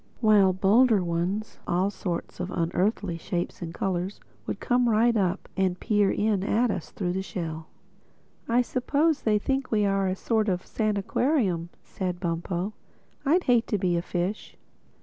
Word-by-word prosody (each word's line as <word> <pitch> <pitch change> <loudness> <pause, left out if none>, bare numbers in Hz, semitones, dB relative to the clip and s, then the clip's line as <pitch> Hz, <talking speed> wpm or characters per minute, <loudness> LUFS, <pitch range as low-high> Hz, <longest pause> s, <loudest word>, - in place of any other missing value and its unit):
While 215 -4 +5
other - - +1
bolder 210 +1 +4
ones, 175 +5 -2
all 185 +3 +1
sorts 175 -4 -5
of 180 - -3
unearthly 180 +1 -1
shapes 175 +2 -3
and 165 -1 -4
colors, 185 +2 -2 0.3
would - - -3
come 245 -1 +2
right 230 +2 +3
up 190 -2 0
and 190 -2 0
peer 205 -2 +2
in 210 -2 +1
at 230 +3 +2
us 175 - -4
through 180 -3 -3
the 190 - -1
shell. 160 -4 -5 0.8
"I 240 +2 +4
suppose 285 +5 +1
they 215 -1 +2
think 270 +5 -1
we 210 -2 +2
are 195 -1 +1
a 185 - 0
sort 220 +1 0
of 180 -1 -1
sanaquarium," 210 - 0
said 180 -2 -4
Bumpo—"I'd 190 - -2
hate 240 -2 +3
to 210 - 0
be 180 -2 +1
a 170 - +1
fish." 180 +4 -3
195 Hz, 160 wpm, -26 LUFS, 180-220 Hz, 0.8 s, While